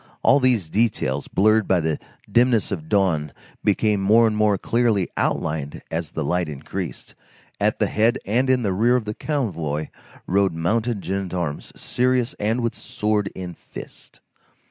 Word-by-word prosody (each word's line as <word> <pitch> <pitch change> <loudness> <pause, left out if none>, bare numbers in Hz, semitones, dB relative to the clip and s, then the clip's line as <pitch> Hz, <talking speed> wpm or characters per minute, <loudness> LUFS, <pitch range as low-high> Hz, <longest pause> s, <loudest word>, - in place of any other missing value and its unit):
All 140 - +6
these 125 - +2
details, 80 - 0
blurred 110 +2 +3
by 95 - +3
the 80 -2 -1 0.3
dimness 120 0 +3
of 80 -5 -4
dawn, 85 -7 +1 0.3
became 105 0 +2
more 110 +4 +5
and 110 -1 +1
more 105 -2 +3
clearly 115 -2 +1
outlined 75 -2 -2
as 80 -2 -2
the 80 - -2
light 85 +3 0
increased. 80 +5 -6 0.5
At - - +1
the - - +2
head 115 +3 +2
and 125 +6 +1
in 130 -2 +3
the 100 -3 0
rear 115 +6 +3
of 125 -3 0
the 105 - -3
convoy 85 - -2 0.4
rode 95 -1 +2
mounted 110 +6 -1
gendarmes, 90 -5 -3
serious 125 -1 0
and 110 +4 0
with 115 -1 -1
sword 105 -1 -1
in 90 -2 -6
fist. - - -12
100 Hz, 155 wpm, -23 LUFS, 85-115 Hz, 0.5 s, All